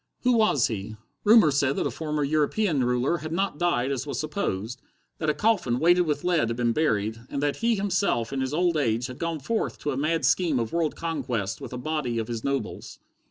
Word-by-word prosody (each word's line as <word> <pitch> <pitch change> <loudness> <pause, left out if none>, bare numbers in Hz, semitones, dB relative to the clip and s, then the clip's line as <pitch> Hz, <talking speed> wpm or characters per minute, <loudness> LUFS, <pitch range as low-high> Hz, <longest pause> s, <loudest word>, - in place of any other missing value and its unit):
Who 250 - +4
was 215 - +3
he? 110 -1 -4 0.3
Rumor 215 -7 +6
said 140 0 +1
that - - -1
a - - -1
former 150 -2 -2
European 155 +2 +1
ruler 125 +6 +1
had 155 +1 -6
not 190 -2 -1
died 140 -7 +1
as 135 +1 -3
was - - -3
supposed: 125 - -3 0.4
that 155 - 0
a - - +3
coffin 180 - +1
weighted 175 +3 +4
with 145 -1 -1
lead 170 -9 +2
had 115 - -3
been 120 -1 +1
buried, 110 -7 0
and 140 - -3
that 145 -1 0
he 230 0 +2
himself 195 - 0
in 135 - -1
his 130 0 -2
old 170 +1 +1
age, 120 -4 0
had 125 0 -7
gone 165 -1 -2
forth 225 - -2
to 150 - -1
a 130 - -3
mad 160 +3 0
scheme 170 -7 +2
of 115 -2 -2
world 165 -2 0
conquest 125 - -3
with - - -7
a 125 - -5
body 125 -3 -2
of 110 0 -3
his 115 -2 -4
nobles. 140 -1 -3
145 Hz, 220 wpm, -26 LUFS, 125-170 Hz, 0.4 s, Rumor